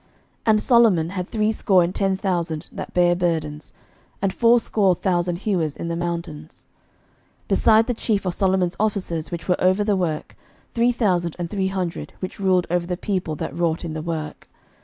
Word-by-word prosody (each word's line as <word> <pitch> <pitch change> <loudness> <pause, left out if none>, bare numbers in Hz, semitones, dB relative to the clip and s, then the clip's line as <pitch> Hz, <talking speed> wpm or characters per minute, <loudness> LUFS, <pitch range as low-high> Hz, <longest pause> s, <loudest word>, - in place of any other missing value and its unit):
11:005:015 - - -35 0.4
And 215 -1 +4
Solomon 220 -10 +4
had 185 -2 -4
threescore 210 -4 +2
and 175 +2 -2
ten 195 -1 0
thousand 170 -5 -2
that - - -7
bare 175 -1 +3
burdens, 160 -4 -2 0.4
and 195 -1 0
fourscore 225 -5 +3
thousand 175 -1 0
hewers 170 -8 0
in 170 - -4
the 170 - -2
mountains; 170 -2 -5 0.8
11:005:016 - - -37
Beside 220 0 +4
the 245 - -1
chief 215 -3 -1
of 180 - -1
Solomon's 185 -2 +1
officers 190 -6 -1
which 170 -1 -6
were 180 - +1
over 185 +3 +3
the 205 -1 +1
work, 165 -5 -3 0.4
three 235 +1 +3
thousand 180 -8 0
and 175 -2 -5
three 195 -2 0
hundred, 185 -3 -4
which 185 - -6
ruled 185 -2 +2
over 175 -1 0
the 180 -1 -2
people 185 -6 -2
that - - -5
wrought 170 0 -1
in 160 - -4
the 155 - -4
work. 155 -2 -5
180 Hz, 180 wpm, -22 LUFS, 170-200 Hz, 0.8 s, And